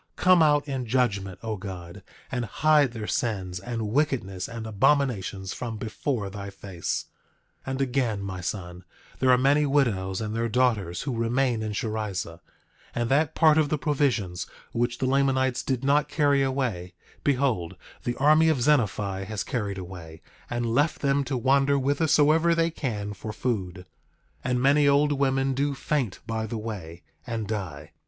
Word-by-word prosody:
Come 180 -2 +5
out 150 -1 +4
in 130 -3 -3
judgment, 100 -7 0
O 110 -2 -3
God, 95 -1 -8 0.3
and 125 -2 -1
hide 150 +3 +3
their 110 -3 -5
sins, 95 -6 -2
and 115 +1 -4
wickedness, 115 -9 0
and 115 -1 -6
abominations 105 -4 +1
from 115 -3 -5
before 110 0 -3
thy 100 0 -6
face! 95 -3 -4 0.6
9:16 - - -2
And 130 +1 -2
again, 125 -6 0
my 95 -2 -5
son, 90 -1 -5 0.4
there 130 - +2
are 125 - +7
many 145 +3 +3
widows 100 -10 +1
and 110 0 -3
their 115 0 0
daughters 110 -8 +1
who 135 -4 -3
remain 120 +1 +1
in 110 -1 -3
Sherrizah; 105 -2 -3 0.6
and 120 -1 -1
that 150 +3 +2
part 160 -1 +5
of 150 -2 +2
the 155 - +1
provisions 125 - 0 0.2
which 120 +1 -1
the - - -1
Lamanites 130 -1 +2
did 130 -1 -2
not 145 +1 +3
carry 145 -3 +3
away, 125 -10 -2 0.3
behold, 125 -11 0 0.3
the 120 - -2
army 155 +3 +5
of 155 -5 +2
Zenephi 105 -8 +1
has 105 +1 -3
carried 105 -5 -3
away, 85 -3 -9 0.3
and 120 -1 -1
left 145 +5 +1
them 140 0 +2
to 135 -2 -2
wander 135 +3 +3
whithersoever 150 +4 +3
they 165 0 +2
can 105 -10 -3
for 105 +2 -7
food; 95 -6 -3 0.6
and 125 -1 0
many 140 +3 +4
old 145 +1 +4
women 135 -1 +1
do 140 +1 0
faint 130 -8 -2
by 110 -1 -2
the 115 - -4
way 95 -7 -7 0.2
and 115 -3 -3
die. 90 -9 -5
120 Hz, 160 wpm, -26 LUFS, 100-140 Hz, 0.6 s, are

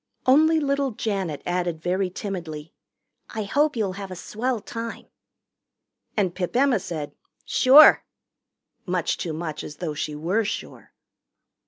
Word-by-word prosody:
Only 315 +5 +5
little 280 -1 0
Janet 195 - -3
added 175 -2 -1
very 180 +3 -1
timidly, 170 -6 -6 0.6
"I 220 - -1
hope 290 +8 +1
you'll 205 -5 -1
have 195 - -6
a 185 - -6
swell 235 +6 -3
time." 230 +2 -7 1.1
And 190 -4 +1
Pip 180 +2 -4
Emma 260 -3 +3
said, 160 -5 -5 0.3
"Sure," 275 +4 +7 0.8
much 180 -2 0
too 175 - -3
much 155 -1 -5
as 150 - -8
though 160 -1 -4
she 150 +1 -4
were 180 +9 0
sure. 215 - -6
195 Hz, 135 wpm, -24 LUFS, 170-240 Hz, 1.1 s, Sure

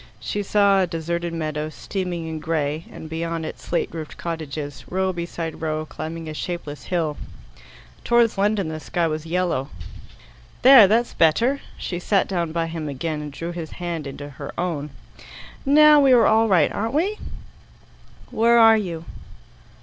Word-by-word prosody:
She 205 - -3
saw 200 -1 +3
a 185 - +1
deserted 170 +1 -3
meadow, 155 -2 -3
steaming 175 0 -4
and 160 -1 -5
grey, 155 -1 -2
and 160 - -9
beyond 165 0 -3
it - - -7
slateroofed 165 -2 -4
cottages, 150 -4 -5
row 190 +1 0
beside 170 -2 -5
row, 155 -1 -2
climbing 160 +1 -7
a 155 - -5
shapeless 155 -3 -6
hill. 160 -5 -1 0.9
Towards 235 -1 +3
London 200 -2 +1
the 155 0 -5
sky 170 +4 -1
was 155 0 -3
yellow. 170 -6 -1 0.9
"There. 255 -6 +9
That's 230 +4 +1
better." 230 - +2 0.2
She 175 - -4
sat 195 +2 +1
down 170 -4 -2
by 165 0 -1
him 165 -2 -5
again, 150 +3 -3
and 150 -1 -6
drew 165 +5 -5
his 170 -2 -7
hand 170 -4 -4
into 140 +1 -7
her 140 -3 -8
own. 160 -5 -2 0.8
"Now 300 +1 +7
we 270 -2 +5
are 240 - +6
all 220 +1 +4
right, 180 -7 +3
aren't 225 +5 -3
we?" 390 +7 0 1.1
"Where 235 +2 +4
are 225 -1 +7
you?" 170 -6 -4
170 Hz, 155 wpm, -23 LUFS, 155-200 Hz, 1.1 s, There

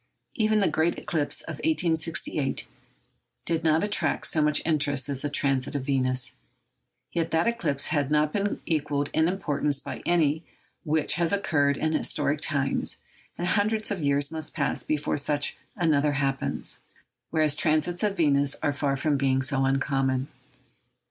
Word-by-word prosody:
Even 215 -2 +2
the 195 - +4
great 160 +2 +1
eclipse 150 -4 -1
of - - -7
1868 165 - -1 0.8
did 165 -1 +1
not 160 0 +3
attract 205 0 0
so 155 - +3
much 150 0 +3
interest 145 -4 +1
as 135 -2 -2
the 145 - -1
transit 135 -2 +1
of 140 - -1
Venus; 130 -1 +1 0.8
yet 165 -1 -1
that 165 0 +2
eclipse 165 -12 0
had 145 -3 0
not 150 0 +2
been 205 0 -1
equalled 145 -3 -1
in 160 +1 +3
importance 150 -6 -1
by - - -7
any 160 -3 +2 0.4
which 155 -1 0
has 170 - +2
occurred 145 -8 +2
in 155 0 0
historic 150 -1 0
times, 140 -2 0 0.4
and 175 0 -1
hundreds 215 +2 +1
of 200 - -2
years 140 0 +1
must 160 -1 -6
pass - - 0
before 150 -1 -1
such 145 0 0 0.2
another 150 -5 +2
happens, 135 -1 -2 0.5
whereas 155 -2 +2
transits 155 +3 +1
of 205 -2 0
Venus 145 -3 +3
are 145 - +2
far 140 -1 0
from 145 +1 +1
being 135 -1 +1
so 135 0 +2
uncommon. 135 0 0
150 Hz, 155 wpm, -26 LUFS, 140-165 Hz, 0.8 s, the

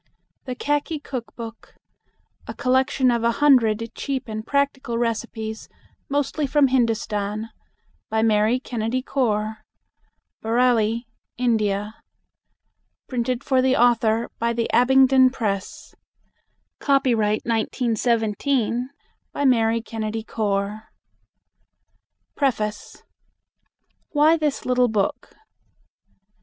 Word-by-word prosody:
THE 255 -1 -4
KHAKI 295 +4 -1
KOOK 250 -4 -6
BOOK 230 -1 -10 0.7
A - - -6
COLLECTION 260 0 +2
OF 235 -1 0
A 235 - +3
HUNDRED 230 -5 +3
CHEAP 270 -3 -4
AND 220 0 -6
PRACTICAL 280 -4 0
RECIPES 225 -1 -3 0.4
MOSTLY 285 +1 -1
FROM 280 0 +3
HINDUSTAN. 220 -3 -1 0.6
By 220 0 +1
MARY 220 +2 +3
KENNEDY 245 0 -3
CORE 220 -5 -1 0.8
Bareilly, 230 -1 +2 0.3
India. 215 -4 0 1.2
PRINTED 250 0 -2
FOR 260 -2 +2
THE 260 0 +2
AUTHOR 230 -1 +2
BY 235 0 0
THE 230 0 -2
ABINGDON 260 +1 +5
PRESS 205 -7 -4 0.9
Copyright, 235 -7 +2
1917, 235 +1 0 0.4
by 285 - -2
Mary 230 -3 +3
Kennedy 220 -1 -4
Core. 210 0 -2 1.5
Preface. 215 -7 -2 1.1
WHY 305 +2 +5
THIS 305 -3 -2
LITTLE 250 0 +3
BOOK. 210 -4 -2
235 Hz, 95 wpm, -23 LUFS, 220-260 Hz, 1.5 s, ABINGDON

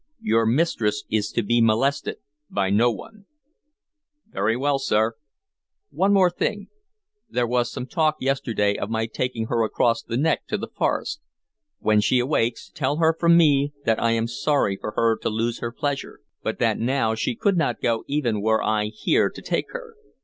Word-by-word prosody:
Your 115 +1 +2
mistress 115 -6 +1
is 105 -1 0
to 115 - 0
be 120 +3 +2
molested 115 +6 +1 0.3
by 95 -1 0
no 115 +4 +4
one." 200 - -9 1.0
"Very 110 +4 0
well, 140 +1 +1
sir." 110 -4 +1 0.8
"One 195 - +1 0.2
thing 205 +4 -1
more. - - -15 0.6
There 125 - 0
was 120 0 0
some 125 - -5
talk 155 +2 +1
yesterday 115 -6 0
of 100 - -3
my 110 0 0
taking 115 0 -3
her 115 0 0
across 115 +2 +1
the 115 - -4
neck 160 +5 0
to - - -1
the - - -5
forest. 300 - -1 0.6
When 105 -1 +2
she 125 +4 +2
awakes, 125 -2 0
tell 145 - -1
her 165 0 +3
from 170 0 +4
me 145 -3 +3
that 110 -1 +1
I 115 0 +2
am 115 0 0
sorry 120 -3 0
for 105 - -6
her 115 -1 +3
to - - -1
lose 115 +2 -2
her 120 - -4
pleasure, 140 - -4 0.2
but - - -3
that - - +1
now 120 -1 +1
she 115 +1 -2
could 200 - +1
not 160 -8 0
go 115 -1 0
even 120 -8 0
were 110 +1 +2
I 105 -1 +1
here 105 0 +1
to - - -11
take - - -2
her." - - -7
120 Hz, 180 wpm, -23 LUFS, 110-140 Hz, 1.0 s, no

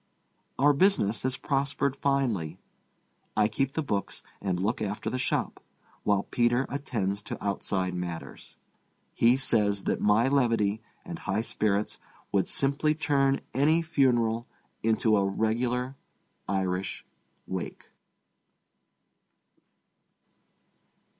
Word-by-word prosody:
Our 145 +2 +5
business 140 - +3
has 130 0 -1
prospered 140 0 0
finely. 120 - 0 0.8
I 105 -1 +5
keep 135 +5 -1
the 160 - -1
books 100 -7 -3 0.2
and 95 -3 -1
look 105 +6 -1
after 105 -1 -3
the 130 - -2
shop, - - -1 0.4
while 100 -1 +2
Peter 120 +2 +1
attends 105 -9 -2
to - - -6
outside 95 -2 -1
matters. 90 -2 -6 0.6
He 120 +2 +4
says 105 -6 +2
that - - -1
my 105 +4 +4
levity 115 -6 +2 0.2
and 170 -2 -6
high 100 +2 -1
spirits 105 -2 0 0.3
would 95 -3 +2
simply 140 +3 +2
turn 140 -3 +2
any 155 +6 +3
funeral 120 -7 +2 0.3
into 110 0 +3
a 100 - +3
regular 120 +6 0 0.5
Irish 95 -1 -2 0.4
wake. 95 -1 -6
115 Hz, 110 wpm, -28 LUFS, 100-135 Hz, 0.8 s, Our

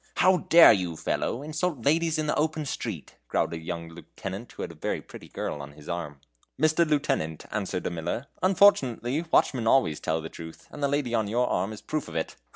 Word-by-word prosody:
"How 185 +1 +5
dare 170 -7 +8
you, 90 -5 -2
fellow, 125 - -2
insult 155 -4 -2
ladies 160 +2 +2
in 155 - -1
the 150 - +1
open 155 0 0
street?" - - -5
growled - - 0
a 85 - -4
young 85 0 -5
lieutenant, 95 +6 -8
who - - -6
had - - -5
a - - -11
very - - -3
pretty - - -12
girl 75 - -4
on 70 +1 -9
his 75 0 -15
arm. 85 -5 -4 0.4
"Mr. 155 +3 +4
Lieutenant," 140 - 0
answered 95 -3 -3
a - - -1
miller, 85 +9 -3 0.2
"unfortunately 155 - +3
watchmen 120 -4 +3
always 85 - +3
tell 80 +1 -1
the 80 - -6
truth, 80 0 -11
and - - -9
the 140 - +3
lady 140 -4 -1
on 110 -3 +1
your 120 +4 +1
arm 95 +4 0
is 110 - -8
a - - -33
proof 155 -2 -3
of 85 - -9
it. 80 - -2
120 Hz, 215 wpm, -27 LUFS, -, 0.4 s, dare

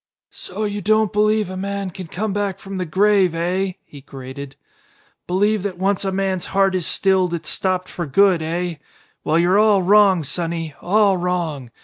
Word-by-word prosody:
"So 200 +4 -6
you 205 -1 -3
don't 215 +1 +2
believe 215 -1 +2
a - - -6
man 195 0 -4
can 185 -1 -8
come 205 +5 -3
back 200 -2 -2
from 195 0 -8
the 180 -2 -3
grave, 190 0 +3
eh?" 185 +3 -1
he 145 - -13
grated. 135 +1 -9 0.7
"Believe 205 +3 +1
that 190 -2 -4
once 195 +2 0
a 195 - -1
man's 190 -2 -2
heart 195 -1 +4
is 185 -3 -1
stilled 190 -3 +1
it's 165 - -3
stopped 185 -1 -1
for 170 -2 -5
good, 185 +3 +3
eh? 170 +1 -3 0.5
Well, 155 - +1
you're 180 +4 +3
all 210 -3 +4
wrong, 195 -2 +5
sonny. 165 +1 -3
All 200 +1 +3
wrong! 170 -8 -2
185 Hz, 175 wpm, -20 LUFS, 170-200 Hz, 0.7 s, wrong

